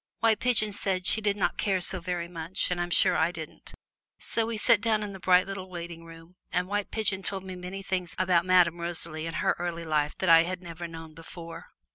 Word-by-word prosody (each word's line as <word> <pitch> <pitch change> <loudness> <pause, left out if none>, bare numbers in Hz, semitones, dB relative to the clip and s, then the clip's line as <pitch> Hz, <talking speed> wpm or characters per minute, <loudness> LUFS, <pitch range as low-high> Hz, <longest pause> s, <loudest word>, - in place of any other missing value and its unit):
White 225 -2 +3
Pigeon 215 -4 +3
said 190 -2 -2
she 220 - +4
did 205 -1 0
not 195 - 0
care 195 -2 +1
so 185 +1 0
very 175 -1 -3
much, 170 +2 -2
and 175 -1 -1
I'm 175 - -2
sure - - +4
I 160 +2 +2
didn't. 160 -3 -9 0.5
So 225 -1 -2
we 230 -1 -3
sat 210 0 +4
down 215 -1 +1
in 205 -1 -5
the 190 - -9
bright 180 0 +4
little 195 -1 -6
waiting 170 -1 -8
room, 165 +2 -14
and 180 0 0
White 205 +1 -2
Pigeon 205 -3 -1
told 190 0 -4
me 185 -1 -7
many 180 +2 -7
things 180 -3 -3
about 180 -2 +3
Madame 175 -2 +3
Rosalie 165 -2 -2
and 165 - -5
her - - +1
early 170 -1 -3
life 150 -2 0
that 190 - -2
I 165 -1 +8
had 180 +2 -4
never 170 0 -7
known 165 -1 -10
before. 165 +1 -10
180 Hz, 225 wpm, -28 LUFS, 170-195 Hz, 0.5 s, I